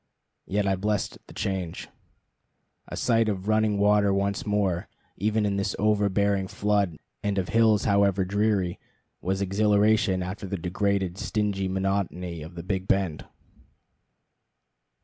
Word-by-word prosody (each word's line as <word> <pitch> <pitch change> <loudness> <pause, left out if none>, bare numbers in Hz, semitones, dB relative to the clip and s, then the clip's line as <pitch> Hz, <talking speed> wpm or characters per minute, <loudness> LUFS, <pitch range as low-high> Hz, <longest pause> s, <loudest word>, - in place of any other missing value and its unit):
Yet 100 +1 0
I 95 - +2
blessed 105 +1 -2
the - - -12
change. 95 -4 -3 1.0
A - - -6
sight 115 -2 +2
of 95 -1 -3
running 110 -1 +2
water 100 0 +4
once 100 +1 -1
more, 100 -4 0 0.3
even 105 +2 +1
of 100 -1 0
this 100 - -1
overbearing 100 -2 +2
flood, 100 -5 0 0.2
and 100 -1 -1
of 95 -2 -1
hills 110 -2 +4
however 100 -2 +3
dreary, 100 -2 0 0.4
was 95 +2 -1
exhilaration 100 -1 +2
after 95 +2 -5
the 100 - -3
degraded, 95 +1 -1
stingy 100 -3 -1
monotony 95 -3 -2
of 80 +3 -9
the 85 - -6
Big 95 +1 -2
Bend. 95 -6 0
100 Hz, 130 wpm, -26 LUFS, 95-105 Hz, 1.0 s, water